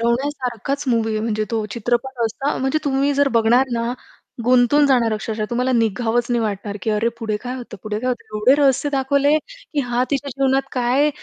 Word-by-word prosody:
रवण्यासारखाच 255 +2 -1
movie 225 -2 +1
आहे 215 - -1
म्हणजे 215 -1 -1
तो 225 -2 -1
चित्रपट 240 +3 -2
असता 270 +6 -2
म्हणजे 270 +4 0
तुम्ही 280 0 +1
जर 285 0 +3
बघणार 240 +4 +4
ना 235 0 -1 0.5
गुंतून 255 +4 +4
जाणार 240 -5 +3
अक्षरशः 215 0 -3
तुम्हाला 250 +2 0
निघावंच 230 +1 +1
नाही 240 - +2
वाटणार, 205 -1 -3
की 220 - 0
अरे 215 +2 +1
पुढे 220 -2 -2
काय 250 +1 -4
होतं, 240 -4 -8
पुढे 210 -1 -3
काय 255 - -2
होतं. 250 - -2
एवढे 230 +6 +5
रहस्य 275 +1 +3
दाखवले 280 +2 +2
की - - -6
हा 245 -2 0
तिच्या 280 0 -1
जीवनात 270 0 +1
काय 255 +4 +2
245 Hz, 185 wpm, -20 LUFS, 225-270 Hz, 0.5 s, एवढे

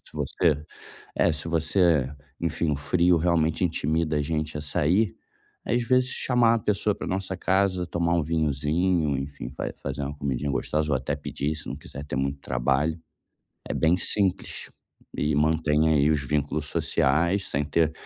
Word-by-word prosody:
se - - -15
você 75 -4 0 0.5
eh, 85 - +3
se 75 +1 -1
você 80 -4 +2 0.3
enfim, 85 -1 0
o - - +1
frio 85 +5 +3
realmente 80 0 +1
intimida 80 -1 0
a 75 - +1
gente 75 0 -2
a - - -3
sair, 85 +7 +1 0.5
aí, 120 - 0
às 120 - +1
vezes, 130 +1 +3
chamar 120 -3 +3
a - - +1
pessoa 105 0 0
pra - - -7
nossa 95 0 -2
casa, 95 0 +1
tomar 85 -1 0
um 85 - +2
vinhozinho, 80 +1 +1
enfim, 70 +1 -6
vai - - -3
fazer 70 +1 -5
uma 70 +1 -4
comidinha 70 0 -2
gostosa, 75 +3 -1
ou 70 - +3
até 65 +2 -2
pedir, 75 +1 -3
se 75 -1 -7
não - - -4
quiser 70 - -9
ter 70 - -4
muito 70 +1 -1
trabalho, 70 +7 0 0.7
é - - -2
bem 80 +2 +3
simples 95 +1 -1 0.5
e 75 0 0
mantém 80 +1 +2
aí 75 -2 +4
os 75 -2 0
vínculos 75 +1 -1
sociais 85 +8 +1
sem 70 +1 0
ter, 80 +2 +1
80 Hz, 175 wpm, -26 LUFS, 70-85 Hz, 0.7 s, aí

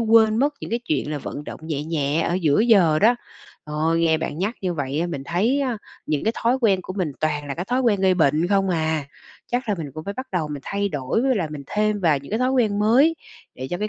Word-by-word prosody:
quên 220 -1 +5
mất 285 +5 +2
những - - -7
cái 235 +1 -1
chuyện 150 - -1
là 150 - -2
vận 145 +1 -6
động - - -8
nhẹ 150 -2 -3
nhẹ 155 -1 0
ở 170 - 0
giữa 160 -4 +2
giờ 195 -9 +5
đó. 225 +8 +5 0.5
Ơi, 155 +2 0
nghe 160 -1 +3
bạn 155 -1 -4
nhắc 205 +6 -1
như 180 -3 -1
vậy 140 0 -2
á 170 - 0
mình 145 -6 -5
thấy 220 - +1
á 255 -5 -1 0.3
những 150 +2 -1
cái 220 - +2
thói 245 +3 +2
quen 205 -6 +3
của 185 - -6
mình 180 -7 -2
toàn 150 -2 -1
là 140 - -4
cái 175 - -4
thói 250 +6 0
quen 225 -6 +2
gây 190 -1 +4
bệnh 160 -1 +2
không 195 -1 +2
à. 160 -3 0 0.5
Chắc 245 -1 -1
là 210 - +2
mình 150 -4 -5
cũng 155 - -7
phải 200 - -4
bắt 260 +4 -5
đầu 165 -5 -1
mình 145 -2 -6
thay 200 0 -1
đổi, 145 - -1
với 265 0 +2
lại 170 -6 -1
mình 150 -2 -6
thêm 210 +2 0
vào 160 -6 +3
những 140 - -13
cái 220 - 0
thói 255 +1 +1
quen 220 -6 +2
mới 250 +10 +4 0.4
để 130 - -6
cho 175 - -2
cái 210 +2 -2
180 Hz, 270 wpm, -23 LUFS, 155-220 Hz, 0.5 s, quên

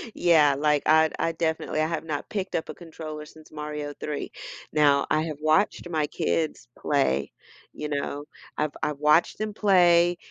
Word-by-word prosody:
Yeah, 155 -5 +4
like, 150 -1 +2
I 160 0 +5
I 165 - +1
definitely 160 -1 -2
I 155 - +1
have 165 -2 -3
not 150 -3 -4
picked 195 -2 -3
up 160 - -2
a - - -4
controller 155 -3 -8
since 155 0 -17
Mario 150 -1 -5
3. 150 -1 -4 0.4
Now, 145 -2 +4
I 155 0 +2
have 155 -3 -5
watched 160 +3 +1
my 155 -3 0
kids 160 -5 -2
play, 70 - 0 0.4
you 150 - -5
know? 145 0 -3 0.3
I've 150 -1 -1
I've 150 -1 -2
watched 150 +3 +3
them 215 -1 -3
play, 175 -4 +4
155 Hz, 170 wpm, -26 LUFS, 150-165 Hz, 0.4 s, I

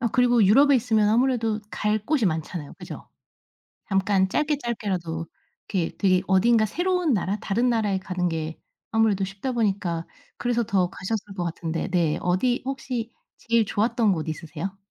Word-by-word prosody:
아 235 - +1
그리고 245 -2 +4
유럽에 275 +7 +6
있으면 220 -3 +2
아무래도 225 -2 +2
갈 210 +1 0
곳이 285 -3 +1
많잖아요, 160 -1 -3
그죠? - - -9 0.8
잠깐 195 -1 +2
짧게 300 +7 +1
짧게라도 185 - -3 0.4
이렇게 180 -5 -1
되게 185 -2 +3
어딘가 215 +4 +4
새로운 350 - 0
나라 200 +1 0
다른 235 +5 +1
나라에 210 -5 +1
가는 180 -1 -2
게 160 -1 -4 0.3
아무래도 220 -3 +2
쉽다 195 +7 -4
보니까 195 -7 -1 0.3
그래서 240 -1 0
더 190 -4 +1
가셨을 200 +2 -4
것 180 - -2
같은데 165 -1 -3
네. 170 -4 +1
어디 190 +8 +1
혹시 255 -4 -4 0.3
제일 230 -1 +1
좋았던 215 0 +1
곳 160 -1 -4
있으세요? 165 +4 -5
205 Hz, 350 characters per minute, -25 LUFS, 180-235 Hz, 0.8 s, 유럽에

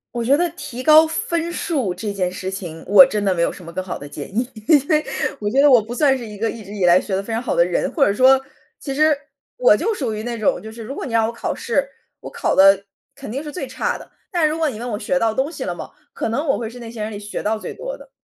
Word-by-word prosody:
我 240 - -1
觉 270 +4 +5
得 345 +3 +1
提 255 -7 -8
高 310 +3 +7
分 335 +1 -2
数 270 - -1
这 215 -2 -4
件 190 -3 -1
事 185 +1 -5
情， 170 -4 -7
我 205 +8 +9
真 210 -6 -2
的 195 -2 +2
没 170 - -1
有 - - +2
什 185 - -12
么 170 - -9
更 185 - -3
好 185 - -5
的 145 - -9
建 145 0 -7
议， 245 - +2 0.2
因 285 -3 +5
为 305 -1 +2 0.3
我 205 - -1
觉 265 +6 +3
得 290 0 +6
我 245 -3 +7
不 230 +3 -7
算 270 0 +3
是 240 - -7
一 210 -2 -9
个 225 +2 -1
一 225 - -9
直 205 +2 -9
以 195 - -2
来 175 0 +6
学 190 - -3
得 195 - -2
非 225 - -7
常 225 - -1
好 250 - -2
的 - - +5
人， - - -1
或 285 -5 +4
者 200 - +2
说， 260 +4 +5 0.4
其 275 - -5
实 305 +1 +3 0.4
我 - - +5
就 455 - 0
属 260 - -3
于 215 0 -5
那 240 0 -4
种， 230 +5 +1
就 220 - -9
是 225 +1 -9
如 245 +5 -6
果 - - -5
你 245 - -6
让 225 -1 +3
我 - - -3
考 235 - -4
试， 275 +4 -1 0.3
我 - - -9
考 - - -1
得 195 0 +6 0.3
肯 275 -5 -8
定 270 +4 -3
是 295 -1 -8
最 365 - -4
差 - - -2
的， - - -14 0.2
但 340 -4 +2
如 310 - -2
果 320 -2 +1
你 235 - -7
问 245 +1 -4
我 210 -3 -3
学 270 - 0
到 225 -4 +1
东 265 +5 0
西 335 - -6
了 - - -2
吗？ - - -8 0.2
可 - - -3
能 265 +8 -1
我 275 - +1
会 230 -2 -4
是 245 +2 -11
那 230 -1 -8
些 230 -2 -7
人 210 - -2
里 210 - -6
学 205 0 -6
到 220 +1 0
最 - - -7
多 - - -6
的。 - - -15
235 Hz, 330 characters per minute, -20 LUFS, 205-285 Hz, 0.4 s, 我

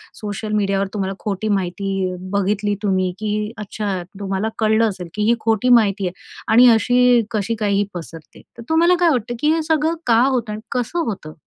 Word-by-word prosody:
Social 210 0 -5
मीडियावर 200 -1 0
तुम्हाला 195 -2 -2
खोटी 205 0 -3
माहिती 195 -1 -1 0.2
बघितली 205 +1 0
तुम्ही, 185 -2 +1
की 210 0 -2
अच्छा 205 -2 -4 0.2
तुम्हाला 195 +2 -2
कळलं 220 0 +3
असेल 185 -3 -7
की 210 - -2
ही 235 - +4
खोटी 225 +2 +1
माहिती 200 -3 -1
आहे 175 - -5 0.4
आणि 245 +3 +8
अशी 245 +1 +3
कशी 220 +1 -1
काय 210 -2 0
ही 200 +1 +2
पसरते? 165 -2 -10 0.2
तर 235 - -9
तुम्हाला 335 +3 +4
काय 350 -1 +4
वाटतं 240 -3 -2
की 300 +4 +2
हे 325 - 0
सगळं 320 +1 +1
का 230 -1 +5
होतं 250 -5 0
आणि 215 - -7
कसं 250 +8 -2
होतं? 190 - -5
210 Hz, 185 wpm, -20 LUFS, 195-235 Hz, 0.4 s, आणि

